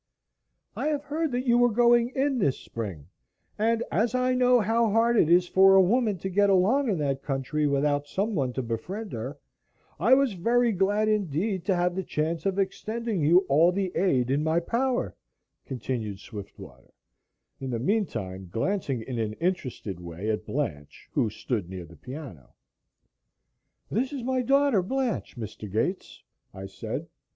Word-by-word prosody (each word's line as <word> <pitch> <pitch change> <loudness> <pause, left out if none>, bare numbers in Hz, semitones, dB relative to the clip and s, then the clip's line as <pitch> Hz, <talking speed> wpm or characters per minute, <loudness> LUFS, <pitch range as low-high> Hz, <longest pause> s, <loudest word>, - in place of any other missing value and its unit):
"I - - -2
have 295 -2 -1
heard 305 +1 -2
that 250 +1 -2
you 240 -1 +4
were 245 0 +5
going 240 +1 +4
in 270 -1 +1
this 140 - +1
spring, 95 -11 -6 0.5
and 230 +2 +2
as 225 +7 +1
I 255 0 +2
know 250 -1 +4
how 225 +2 +2
hard 230 +3 +3
it 160 - +4
is 175 +1 +5
for 195 +1 +6
a 190 - +8
woman 215 +1 +2
to 190 +3 -4
get 200 +2 +3
along 220 +9 +3
in 195 - +1
that 140 -2 -1
country 140 +2 -1
without 145 +1 +1
someone 185 - -1
to 130 - -3
befriend 180 - -5
her, 125 +5 -5 0.6
I 235 +8 +6
was 275 -4 +2
very 235 +6 +2
glad 205 +2 +1
indeed 195 -2 0
to 190 - +2
have 175 0 0
the 190 - -1
chance 160 0 -2
of 195 0 -1
extending 210 +1 -2
you 170 +5 +5
all 160 +6 +5
the 190 -1 -2
aid 130 -10 +2
in 145 +2 +1
my 160 +2 +2
power," 245 +8 -1 0.5
continued 115 -6 -4
Swiftwater, 100 -1 -11 0.6
in 135 -2 -5
the 120 - -1
meantime 115 - -2
glancing 135 - -1
in 125 0 -4
an 110 -1 -1
interested 130 - -3
way 90 +5 -4
at 105 0 -4
Blanche, 75 - -4
who 110 - +1
stood 105 -3 -3
near 95 -2 -7
the 85 +1 -15
piano. 125 - -10 1.4
"This 255 +6 0
is 275 -4 -5
my 260 +1 0
daughter, 275 -4 +3
Blanche, 245 - -2
Mr. 110 -2 -7
Gates," 115 - -2 0.3
I 95 - -7
said. 95 - -5
180 Hz, 165 wpm, -27 LUFS, -, 1.4 s, a